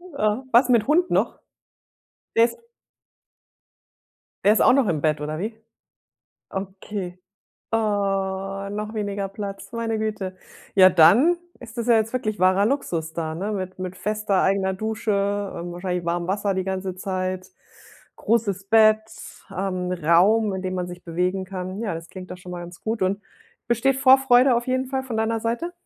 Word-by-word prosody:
Was 260 -5 +1
mit 235 -4 +3
Hund 345 +5 +3
noch? - - +1 1.0
Der 230 - +7
ist 355 - -2 1.9
Der 205 - +6
ist - - +2
auch - - +6
noch 265 -2 +3
im 155 -3 0
Bett 155 0 +1
oder 155 +1 -4
wie? 220 +4 -4 0.9
Okay. 190 -1 -6 0.5
Oh, 225 - +4 0.9
noch 210 +2 -5
weniger 200 -2 -2
Platz, 200 0 -7
meine 230 -1 -2
Güte. 210 -4 -3 0.4
Ja, 185 -1 +8
dann 195 - +6 0.2
ist 235 -1 -11
das 235 - -2
ja 235 - +5
jetzt 220 +1 0
wirklich 215 -6 -2
wahrer 190 +2 +4
Luxus 165 - -2
da, 160 -1 -3
ne? 200 +5 -3
Mit 185 -2 -5
mit 185 0 -5
fester 210 -1 0
eigener 190 0 +1
Dusche, 220 +2 -2 0.4
ähm, 175 +1 -5
wahrscheinlich 180 0 -3
warmen 170 0 -1
Wasser 200 0 0
die 190 - -1
ganze 190 -1 -3
Zeit, 185 -1 -3 0.7
großes 205 -4 0
Bett, 215 +1 +5 0.6
ähm, 185 -1 -2
Raum, 180 +6 +3
in 190 - -4
dem 185 0 -3
man 180 -1 -3
sich 180 0 -10
bewegen 180 +3 -1
kann. 185 +1 -6
Ja, 205 -7 -2
das 165 0 -8
klingt 185 -1 -10
doch 180 - -6
schon 180 -1 -10
mal 175 - -5
ganz 175 0 -10
gut. 220 -2 -2
Und 195 +2 0 0.5
besteht 250 +3 +2
Vorfreude 265 -1 +5
auf 240 +1 -2
jeden 260 +1 0
Fall 265 0 -3
von 235 -4 -4
deiner 225 +1 0
Seite? 240 +10 -2
200 Hz, 165 wpm, -23 LUFS, 185-230 Hz, 1.9 s, Ja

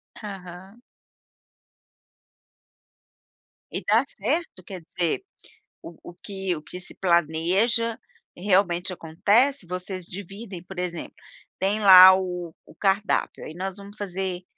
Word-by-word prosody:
Aham. 190 +1 -10 2.9
E - - -4
dá 220 +5 +4
certo? 255 - -3
Quer 185 -3 -8
dizer, 170 - -2 0.6
o 170 - -11
o - - -10
que 190 -1 -4
o 155 - -8
que 180 +3 -9
se 180 - -6
planeja 185 +7 +1 0.4
realmente 185 -1 +1
acontece? 205 - +1
Vocês 180 0 -5
dividem 195 0 -9
por 185 0 -9
exemplo, 175 -2 -5 0.4
tem 200 +3 0
lá 185 -1 +10
o 180 -3 -4
o - - -17
cardápio, 200 +1 0
"aí 155 - -8
nós 190 +2 -5
vamos 200 +1 -12
fazer, 185 -2 -4
190 Hz, 115 wpm, -25 LUFS, 175-205 Hz, 2.9 s, lá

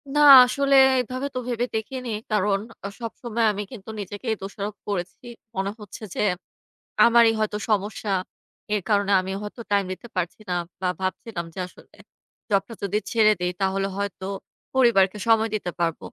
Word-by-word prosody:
না - - +3 0.3
আসলে 275 +2 +2 0.3
এভাবে 255 +3 -4
তো - - 0
ভেবে 240 -1 0
দেখিনি। 250 +3 -4 0.2
কারণ 205 -1 +2 0.3
আ - - -1
সবসময় 230 0 -2
আমি 205 0 -4
কিন্তু 220 -5 -10
নিজেকেই 205 +3 -3
দোষারোপ 200 +1 -5
করেছি। 195 +3 -4 0.3
মনে 195 +1 -1
হচ্ছে 210 +1 -10
যে, - - -1 0.8
আমারই 235 -1 +6
হয়তো 215 -1 0
সমস্যা। 205 0 -1 0.6
এর 210 - +1
কারণে 205 -1 +2
আমি 190 +1 -5
হয়তো 210 +3 -7
টাইম 200 -1 +3
দিতে 235 - -12
পারছি 180 +3 -2
না 180 - 0 0.3
বা 185 - +1
ভাবছিলাম 185 -1 -3
যে, - - -6
আসলে - - -19 0.6
জবটা 200 +2 +1
যদি 200 +1 0
ছেড়ে 215 -2 +5
দেই, 180 0 0
তাহলে 195 0 +1
হয়তো 200 -2 -4 0.5
পরিবারকে 215 -6 +4
সময় 225 0 +4
দিতে 180 -4 -3
পারব 165 -1 0
210 Hz, 155 wpm, -24 LUFS, 195-230 Hz, 0.8 s, আমারই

